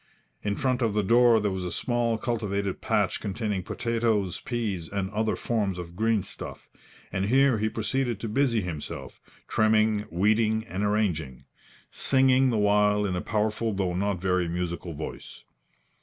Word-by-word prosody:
In 100 Hz, -1 st, -1 dB
front 130 Hz, 0 st, 0 dB
of 110 Hz, -3 st, +1 dB
the 105 Hz, -, +2 dB
door 120 Hz, +2 st, +5 dB
there 105 Hz, -1 st, 0 dB
was 95 Hz, -1 st, -3 dB
a 90 Hz, -, -3 dB
small 120 Hz, -2 st, 0 dB
cultivated 100 Hz, -5 st, -2 dB
patch -, -, +1 dB
containing 105 Hz, -1 st, -2 dB
potatoes, 115 Hz, -3 st, -1 dB
peas 105 Hz, -9 st, -3 dB
and 100 Hz, -1 st, -3 dB
other 110 Hz, +1 st, 0 dB
forms 105 Hz, -6 st, -1 dB
of 85 Hz, -1 st, -7 dB
green 110 Hz, 0 st, +1 dB
stuff, -, -, -8 dB, 0.4 s
and 95 Hz, -, -1 dB
here 130 Hz, +1 st, +4 dB
he 110 Hz, +1 st, +1 dB
proceeded 115 Hz, +1 st, -1 dB
to 115 Hz, -, -3 dB
busy 115 Hz, 0 st, +1 dB
himself, 85 Hz, -5 st, -6 dB, 0.3 s
trimming, 110 Hz, -1 st, +2 dB
weeding 110 Hz, +4 st, +2 dB
and 100 Hz, -2 st, -3 dB
arranging, 90 Hz, -, -1 dB, 0.5 s
singing 130 Hz, -1 st, +3 dB
the 115 Hz, -, +1 dB
while 105 Hz, 0 st, +3 dB
in 95 Hz, -2 st, -1 dB
a 90 Hz, -, -2 dB
powerful 110 Hz, +1 st, -1 dB
though 95 Hz, -2 st, -1 dB
not 100 Hz, +1 st, -1 dB
very 90 Hz, -1 st, +1 dB
musical 85 Hz, 0 st, -3 dB
voice. 80 Hz, -, -8 dB
105 Hz, 155 wpm, -27 LUFS, 95-115 Hz, 0.5 s, door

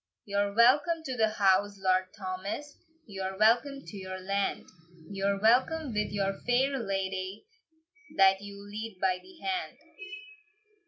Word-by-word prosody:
"You're 200 Hz, 0 st, -1 dB
welcome 295 Hz, +8 st, +4 dB
to 265 Hz, -, -4 dB
your 225 Hz, -4 st, +2 dB
house, 200 Hz, -1 st, +2 dB
Lord 185 Hz, -1 st, +2 dB
Thomas, 195 Hz, +9 st, -5 dB, 0.3 s
You're 190 Hz, -2 st, -5 dB
welcome 245 Hz, +6 st, +3 dB
to 205 Hz, -, -9 dB
your 185 Hz, -1 st, -6 dB
land; 195 Hz, +1 st, -1 dB, 0.5 s
You're 200 Hz, 0 st, 0 dB
welcome 255 Hz, +6 st, +2 dB
with 210 Hz, 0 st, -1 dB
your 195 Hz, -1 st, 0 dB
fair 265 Hz, +3 st, +1 dB
ladye, 195 Hz, -, -3 dB, 0.7 s
That 195 Hz, 0 st, +5 dB
you 200 Hz, 0 st, -10 dB
lead 215 Hz, 0 st, -6 dB
by 185 Hz, -1 st, +1 dB
the 370 Hz, -2 st, -17 dB
hand. 375 Hz, -1 st, -2 dB
200 Hz, 130 wpm, -29 LUFS, 195-245 Hz, 0.7 s, That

